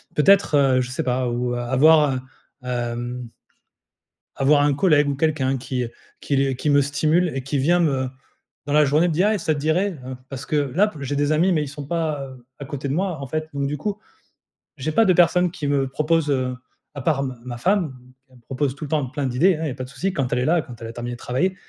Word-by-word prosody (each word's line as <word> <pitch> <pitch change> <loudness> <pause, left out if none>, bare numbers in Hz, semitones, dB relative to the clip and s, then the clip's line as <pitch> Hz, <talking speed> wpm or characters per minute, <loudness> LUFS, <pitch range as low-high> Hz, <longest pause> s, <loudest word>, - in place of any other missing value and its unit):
Peut-être, 195 +1 +4
heu, 135 -2 +4
je 125 - -4
sais 130 - -2
pas, 125 0 0
ou, 120 +1 -1
heu, - - -3
avoir, 145 +4 +4
heu, - - -2 0.4
hem 120 0 -4 1.1
avoir 145 +2 +4
un 145 -1 +3
collègue 150 -2 +3
ou 140 - -1
quelqu'un 135 -3 0
qui, 125 0 -3
heu, 115 - -6 0.3
qui 140 - -2
les 135 -1 +1
qui 150 - -2
me 145 0 +5
stimule 155 +5 +1
et 135 - -3
qui 135 +3 -2
vient 170 +6 +3
me, 135 -6 +1 0.6
dans 145 - -2
la 150 - +6
journée 150 +4 +3
me 170 - 0
dire: 190 +7 +3
«Eh, 215 - 0
ça 160 -3 0
te - - -4
dirait». 170 +5 0
Hein, 130 0 -6
parce 135 0 -7
que 155 -1 0
là 150 +9 +2
p 185 - -13
j'ai 140 +1 -3
des 145 +1 +1
amis 170 +5 +3
mais 155 -3 +1
ils 145 - -6
sont 140 +1 -8
pas, 160 -3 -1
heu, 130 -2 -14
à 140 - -6
côté 140 0 -5
de - - -1
moi 180 +1 -1
en 135 - -5
fait, 155 +3 -3
donc 140 -1 -1
du 150 +1 -3
coup. 205 +7 -3 0.8
J'ai 140 +4 -2
pas 225 +9 +4
de 185 - +4
personne 180 +1 +4
qui 150 - -5
me 140 -1 +1
propose, 155 +2 0
heu, 130 -2 0 0.4
à 140 - -6
part 150 0 +1
m 130 -2 -4
ma 120 -1 -6
femme 185 +3 +1
mmh, 125 -1 -15 0.2
elle 130 - -20
me - - -19
propose 135 +2 -2
tout 145 - -7
le - - -6
temps 150 -1 0
plein 140 +2 -3
d'idées 155 +9 +3
hein. 160 - -4
Il - - -1
y - - -2
a 130 - -5
pas 130 - -6
de 125 - -12
souci 180 +8 -2
quand 135 -6 -2
elle 125 - +2
est - - 0
là 170 +2 +3
et - - -6
quand 120 -3 -12
elle 115 - -6
a - - -7
terminé 120 +1 -5
de - - -11
travailler, 135 +12 -1
140 Hz, 270 wpm, -22 LUFS, 130-155 Hz, 1.1 s, la